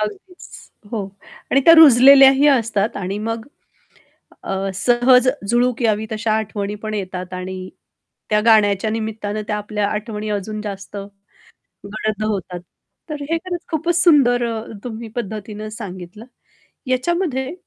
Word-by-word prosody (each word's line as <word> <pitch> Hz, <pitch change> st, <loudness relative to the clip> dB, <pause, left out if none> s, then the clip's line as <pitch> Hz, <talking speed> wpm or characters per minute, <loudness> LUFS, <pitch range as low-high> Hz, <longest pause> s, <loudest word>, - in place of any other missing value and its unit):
अगदीच. 360 Hz, -, -7 dB, 0.4 s
हो. 215 Hz, -4 st, -2 dB, 0.5 s
आणि 275 Hz, -, +4 dB
त्या 330 Hz, -, +9 dB
रुजलेल्याही 275 Hz, -1 st, +7 dB
असतात 225 Hz, -5 st, +1 dB
आणि 195 Hz, +1 st, -4 dB
मग, 225 Hz, +2 st, -4 dB, 1.0 s
अ, 195 Hz, 0 st, -3 dB
सहज 250 Hz, +4 st, +3 dB, 0.2 s
झुळूक 240 Hz, +1 st, +1 dB
यावी 220 Hz, -1 st, +1 dB
तशा 220 Hz, 0 st, -1 dB
आठवणी 210 Hz, -1 st, -3 dB
पण 215 Hz, 0 st, -3 dB
येतात. 185 Hz, -2 st, -5 dB
आणि 185 Hz, 0 st, -6 dB, 0.6 s
त्या 210 Hz, 0 st, +3 dB
गाण्याच्या 215 Hz, -2 st, +4 dB
निमित्तानं 215 Hz, -1 st, -4 dB
त्या 210 Hz, -, -1 dB
आपल्या 210 Hz, 0 st, -2 dB
आठवणी 210 Hz, 0 st, -4 dB
अजून 210 Hz, +1 st, -4 dB
जास्त 200 Hz, -1 st, -7 dB, 0.9 s
गडद 215 Hz, +1 st, -3 dB
होतात. 185 Hz, -4 st, -3 dB, 0.5 s
तर 300 Hz, -1 st, -5 dB
हे 330 Hz, -, +1 dB
खरंच 350 Hz, 0 st, -5 dB
खूपच 335 Hz, +2 st, 0 dB
सुंदर 250 Hz, -7 st, +4 dB, 0.4 s
तुम्ही 230 Hz, -1 st, -7 dB
पद्धतीनं 215 Hz, -1 st, -6 dB
सांगितलं. 195 Hz, -1 st, -9 dB, 0.6 s
याच्यामध्ये 265 Hz, +1 st, -1 dB
215 Hz, 120 wpm, -19 LUFS, 205-250 Hz, 1.0 s, त्या